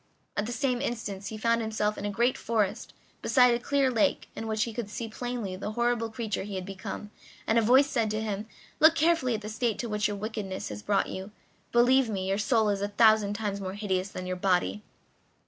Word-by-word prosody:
At 205 Hz, -, -1 dB
the -, -, -4 dB
same 250 Hz, -1 st, 0 dB
instant 205 Hz, -4 st, -4 dB
he 220 Hz, -, -5 dB
found 230 Hz, +1 st, +2 dB
himself 215 Hz, -1 st, -1 dB
in 200 Hz, -, -5 dB
a -, -, 0 dB
great 235 Hz, +5 st, +1 dB
forest, 215 Hz, -4 st, -1 dB, 0.3 s
beside 250 Hz, -2 st, +5 dB
a 235 Hz, -, 0 dB
clear 275 Hz, +1 st, +1 dB
lake, 225 Hz, -3 st, +1 dB
in 225 Hz, -, -5 dB
which 220 Hz, 0 st, +1 dB
he 230 Hz, -, -4 dB
could 225 Hz, -2 st, -4 dB
see 225 Hz, +2 st, -5 dB
plainly 230 Hz, -4 st, -4 dB
the 210 Hz, +3 st, -5 dB
horrible 235 Hz, -1 st, 0 dB
creature 220 Hz, -1 st, -3 dB
he 200 Hz, 0 st, -6 dB
had 185 Hz, -1 st, -4 dB
become, 195 Hz, +2 st, -7 dB, 0.3 s
and 225 Hz, +1 st, +3 dB
a -, -, +3 dB
voice 255 Hz, +5 st, +6 dB
said 230 Hz, -6 st, 0 dB
to 215 Hz, +1 st, -1 dB
him: 215 Hz, -1 st, -3 dB, 0.3 s
"Look 315 Hz, +1 st, +7 dB
carefully 320 Hz, -6 st, +2 dB
at 215 Hz, -, -5 dB
the 210 Hz, -, -7 dB
state 220 Hz, 0 st, -1 dB
to 235 Hz, -, -4 dB
which 210 Hz, 0 st, +1 dB
your 205 Hz, -1 st, -4 dB
wickedness 210 Hz, -2 st, -4 dB
has 105 Hz, 0 st, -6 dB
brought 200 Hz, -, +1 dB
you; 190 Hz, +2 st, -6 dB, 0.4 s
believe 245 Hz, +1 st, +4 dB
me, 190 Hz, -3 st, -2 dB
your 195 Hz, +1 st, 0 dB
soul 220 Hz, 0 st, +2 dB
is 200 Hz, -1 st, 0 dB
a 200 Hz, -, 0 dB
thousand 215 Hz, -1 st, +4 dB
times 205 Hz, -2 st, -3 dB
more 190 Hz, 0 st, -4 dB
hideous 195 Hz, -2 st, -1 dB
than 185 Hz, -1 st, -6 dB
your 185 Hz, 0 st, -3 dB
body." 180 Hz, -, +1 dB
215 Hz, 225 wpm, -28 LUFS, 200-235 Hz, 0.4 s, Look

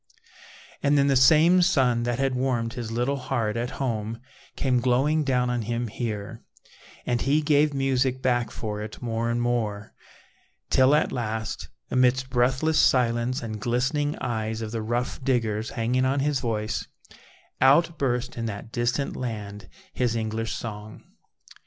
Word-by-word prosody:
And 145 Hz, +1 st, +3 dB
then 140 Hz, -, +4 dB
the 140 Hz, -1 st, +3 dB
same 160 Hz, +7 st, +6 dB
sun 130 Hz, -10 st, +3 dB
that 120 Hz, -, -1 dB
had 135 Hz, -1 st, 0 dB
warmed 125 Hz, -3 st, -1 dB
his 120 Hz, -3 st, -5 dB
little 125 Hz, +5 st, 0 dB
heart 120 Hz, -5 st, -2 dB
at 120 Hz, +1 st, -2 dB
home 115 Hz, -4 st, -2 dB, 0.4 s
came 130 Hz, -2 st, +1 dB
glowing 135 Hz, +6 st, +2 dB
down 125 Hz, -3 st, +1 dB
on 120 Hz, -1 st, -1 dB
him 120 Hz, +1 st, -2 dB
here, 105 Hz, -3 st, -5 dB, 0.6 s
and 120 Hz, -1 st, 0 dB
he 150 Hz, +3 st, +2 dB
gave 150 Hz, 0 st, +3 dB
music 135 Hz, -2 st, 0 dB
back 120 Hz, -2 st, +1 dB
for 105 Hz, -1 st, -5 dB
it 105 Hz, 0 st, -7 dB
more 115 Hz, -1 st, -2 dB
and 120 Hz, 0 st, 0 dB
more, 110 Hz, -4 st, -2 dB, 0.8 s
till 130 Hz, +2 st, +5 dB
at -, -, +1 dB
last 110 Hz, -2 st, -4 dB, 0.2 s
amidst 130 Hz, 0 st, +2 dB
breathless 130 Hz, +5 st, +2 dB
silence 120 Hz, 0 st, +2 dB
and 110 Hz, -2 st, -5 dB
glistening 130 Hz, +6 st, 0 dB
eyes 110 Hz, -2 st, -3 dB
of 110 Hz, -, -5 dB
the 115 Hz, -1 st, -3 dB
rough 120 Hz, +4 st, -2 dB
diggers 115 Hz, -4 st, 0 dB
hanging 120 Hz, +3 st, 0 dB
on 135 Hz, +1 st, +1 dB
his 145 Hz, -1 st, +1 dB
voice 110 Hz, -3 st, -2 dB, 0.7 s
out 155 Hz, +5 st, +4 dB
burst 125 Hz, -2 st, -1 dB
in 115 Hz, 0 st, -2 dB
that 105 Hz, +1 st, -7 dB
distant 125 Hz, +3 st, -1 dB
land 105 Hz, -5 st, -6 dB, 0.2 s
his 120 Hz, -2 st, 0 dB
English 110 Hz, 0 st, -2 dB
song. 105 Hz, -1 st, -7 dB
120 Hz, 150 wpm, -25 LUFS, 115-135 Hz, 0.8 s, same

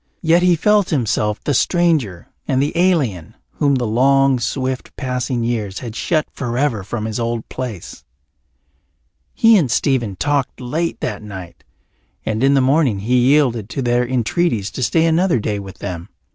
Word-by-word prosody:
Yet 165 Hz, +1 st, +4 dB
he 180 Hz, -1 st, +4 dB
felt 205 Hz, +3 st, +2 dB
himself 110 Hz, -7 st, -1 dB
the 145 Hz, -, 0 dB
stranger 150 Hz, -, +1 dB, 0.2 s
and 130 Hz, -, +1 dB
the 145 Hz, +4 st, -1 dB
alien, 150 Hz, -, 0 dB, 0.2 s
whom 140 Hz, -2 st, +1 dB
the 125 Hz, -2 st, -1 dB
long, 135 Hz, +3 st, +3 dB
swift 130 Hz, +1 st, -3 dB
passing 125 Hz, -2 st, -2 dB
years 110 Hz, -5 st, -2 dB
had 115 Hz, -3 st, -7 dB
shut 155 Hz, +2 st, 0 dB
forever 120 Hz, -4 st, -2 dB
from 110 Hz, +2 st, -4 dB
his 110 Hz, +1 st, -3 dB
old 115 Hz, -1 st, -3 dB
place. 120 Hz, -8 st, -7 dB, 1.3 s
He 225 Hz, 0 st, +5 dB
and 150 Hz, -9 st, +1 dB
Stephen 120 Hz, -5 st, 0 dB
talked 145 Hz, +3 st, -1 dB
late 155 Hz, +7 st, -2 dB
that 105 Hz, -, -3 dB
night, 95 Hz, -5 st, -10 dB, 0.6 s
and 110 Hz, +2 st, -1 dB
in 140 Hz, +1 st, +4 dB
the 135 Hz, -, +4 dB
morning 130 Hz, -6 st, +2 dB
he 125 Hz, +4 st, +2 dB
yielded 125 Hz, -7 st, +2 dB
to 135 Hz, -, -3 dB
their 120 Hz, 0 st, +2 dB
entreaties 120 Hz, -, 0 dB
to -, -, -6 dB
stay 160 Hz, +6 st, +2 dB
another 165 Hz, -3 st, +2 dB
day 105 Hz, -1 st, -2 dB
with 95 Hz, -1 st, -10 dB
them. 90 Hz, -2 st, -6 dB
125 Hz, 160 wpm, -19 LUFS, 110-145 Hz, 1.3 s, He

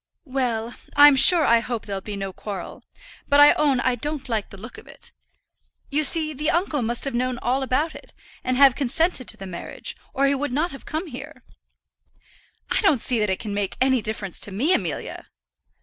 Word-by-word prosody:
"Well; 245 Hz, -4 st, -2 dB, 0.2 s
I'm 290 Hz, 0 st, +8 dB
sure 310 Hz, +4 st, +6 dB
I 235 Hz, -2 st, +4 dB
hope 235 Hz, -1 st, -5 dB
there'll 195 Hz, -2 st, -5 dB
be 205 Hz, +1 st, -7 dB
no 195 Hz, -1 st, -5 dB
quarrel. 200 Hz, 0 st, -7 dB, 0.5 s
But 285 Hz, -, +4 dB
I 290 Hz, 0 st, +8 dB
own 280 Hz, -4 st, +1 dB
I 255 Hz, +1 st, +1 dB
don't 285 Hz, +3 st, -4 dB
like 220 Hz, -4 st, -2 dB
the 195 Hz, -, -12 dB
look 225 Hz, +5 st, -10 dB
of -, -, -18 dB
it. -, -, -13 dB, 0.8 s
You 300 Hz, +2 st, +1 dB
see 310 Hz, +1 st, +2 dB
the 300 Hz, +3 st, -1 dB
uncle 335 Hz, -5 st, 0 dB
must 235 Hz, +1 st, -2 dB
have 275 Hz, -, -1 dB
known 250 Hz, +1 st, -1 dB
all 255 Hz, +2 st, -1 dB
about 270 Hz, +5 st, -1 dB
it, -, -, -13 dB, 0.3 s
and 255 Hz, 0 st, -1 dB
have 275 Hz, -1 st, +7 dB
consented 275 Hz, +1 st, 0 dB
to -, -, -1 dB
the 195 Hz, -, -8 dB
marriage, 180 Hz, -2 st, -7 dB, 0.2 s
or 275 Hz, -, +1 dB
he 275 Hz, -, +3 dB
would 280 Hz, 0 st, -2 dB
not 310 Hz, +7 st, -1 dB
have 270 Hz, -, -11 dB
come 315 Hz, +4 st, -3 dB
here." 330 Hz, -, -10 dB, 1.3 s
"I -, -, +2 dB
don't 385 Hz, -10 st, +3 dB
see 240 Hz, +1 st, +4 dB
that 210 Hz, -1 st, 0 dB
it 190 Hz, -, 0 dB
can 210 Hz, -2 st, -6 dB
make 200 Hz, -1 st, -3 dB
any 260 Hz, -2 st, +2 dB
difference 205 Hz, -3 st, -4 dB
to 205 Hz, -, -5 dB
me, 265 Hz, -, +1 dB
Amelia." 175 Hz, -, -3 dB
255 Hz, 205 wpm, -23 LUFS, 220-290 Hz, 1.3 s, I'm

